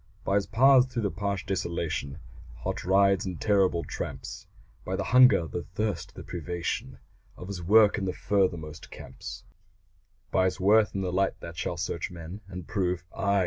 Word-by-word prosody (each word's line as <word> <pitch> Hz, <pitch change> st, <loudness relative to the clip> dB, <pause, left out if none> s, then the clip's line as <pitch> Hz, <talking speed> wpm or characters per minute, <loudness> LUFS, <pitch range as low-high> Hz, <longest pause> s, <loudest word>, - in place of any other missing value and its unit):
By 95 Hz, -, -1 dB
his 100 Hz, 0 st, +2 dB
paths 130 Hz, +2 st, +5 dB
through 120 Hz, -2 st, -2 dB
the 100 Hz, -, 0 dB
parched 100 Hz, +2 st, -3 dB
desolation 85 Hz, -6 st, -2 dB, 0.4 s
Hot -, -, -3 dB
rides 100 Hz, +1 st, +4 dB
and 95 Hz, -2 st, -4 dB
the -, -, -11 dB
terrible 95 Hz, -5 st, +3 dB
tramps; -, -, -6 dB, 0.4 s
By -, -, -3 dB
the -, -, -2 dB
hunger, 125 Hz, -8 st, +6 dB
the 80 Hz, +3 st, -4 dB
thirst, 95 Hz, +1 st, -4 dB
the -, -, -8 dB
privation 85 Hz, 0 st, -4 dB, 0.4 s
Of 90 Hz, -, -9 dB
his 95 Hz, -3 st, -5 dB
work 105 Hz, +4 st, +5 dB
in 95 Hz, -, -2 dB
the 95 Hz, -, 0 dB
furthermost 90 Hz, -8 st, -1 dB
camps; -, -, -9 dB, 0.9 s
By 95 Hz, -, +3 dB
his 95 Hz, +1 st, -1 dB
worth 105 Hz, +3 st, +4 dB
in 95 Hz, -, -1 dB
the 90 Hz, -2 st, -2 dB
light 95 Hz, +1 st, +1 dB
that 85 Hz, -, -8 dB
shall 85 Hz, 0 st, -3 dB
search 85 Hz, +1 st, -3 dB
men 90 Hz, +3 st, -9 dB
And 90 Hz, -3 st, -8 dB
prove 90 Hz, -4 st, -1 dB
ay! 100 Hz, -1 st, +2 dB
95 Hz, 180 wpm, -28 LUFS, 85-100 Hz, 0.9 s, hunger